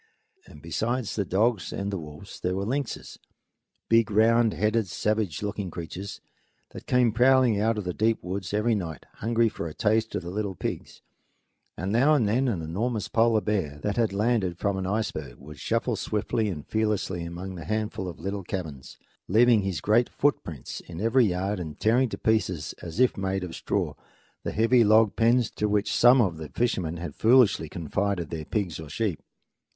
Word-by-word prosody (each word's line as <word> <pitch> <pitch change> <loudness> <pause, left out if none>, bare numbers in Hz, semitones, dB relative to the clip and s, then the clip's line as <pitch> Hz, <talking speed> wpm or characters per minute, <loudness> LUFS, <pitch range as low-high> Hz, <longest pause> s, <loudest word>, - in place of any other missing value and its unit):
And - - -14
besides 120 0 -2
the 100 - 0
dogs 105 +2 +1
and 100 +1 -3
the 100 - -3
wolves 75 +5 -10
there 90 0 -1
were 100 +1 -2
lynxes 135 +3 -4 0.7
big, 115 -1 +4
round 115 +2 +4
headed, 105 0 +1
savage 105 -3 -1
looking 100 -2 -3
creatures 90 +4 -7 0.5
that - - -10
came 125 -2 +3
prowling 125 -1 +4
out 110 +1 +1
of 105 - -2
the 90 -1 -3
deep 110 +3 +1
woods 95 0 -4
every 105 +3 +1
night, 85 -8 -4
hungry 115 +1 +2
for 105 -6 -4
a 75 - -8
taste 110 0 +1
of - - -2
the 85 - -6
little 100 -1 -3
pigs; - - -5 0.7
and 95 +4 -3
now 135 +8 +4
and 120 -8 +2
then 125 +6 +2
an 95 -9 -1
enormous 105 +8 -2
polar 115 -1 +3
bear, 95 -10 -1
that 105 -1 -1
had 115 -3 +2
landed 100 -4 0
from 100 +1 0
an 95 -1 -3
iceberg, 110 +3 -3
would 75 +1 -12
shuffle 115 +1 0
swiftly 105 +1 -1
and 75 -7 -6
fearlessly 105 -5 -1
among 85 +3 -6
the 85 -3 -8
handful 110 -3 -2
of 85 - -10
little 95 +3 -4
cabins, 80 -8 -6 0.3
leaving 115 +2 +5
his 95 -2 -3
great 115 +4 +3
footprints 85 - -2
in 85 -1 -10
every 115 +4 +3
yard 95 +2 -1
and 80 -4 -7
tearing 125 +3 +3
to - - -5
pieces, 95 -8 0
as 85 +5 -7
if 130 -1 +4
made 95 -1 -1
of 90 -2 -6
straw, - - -2 0.5
the - - -3
heavy 115 +2 +4
log 110 -1 +4
pens 120 0 +3
to 105 - -1
which 105 0 +1
some 125 +2 +6
of 95 -8 +2
the 80 -2 -7
fishermen 90 -9 -1
had 85 -3 -6
foolishly 110 - +4
confided 90 +2 -2
their 80 -2 -4
pigs 95 -5 -2
or 80 -2 -8
sheep. 95 +1 -2
105 Hz, 185 wpm, -26 LUFS, 90-115 Hz, 0.7 s, some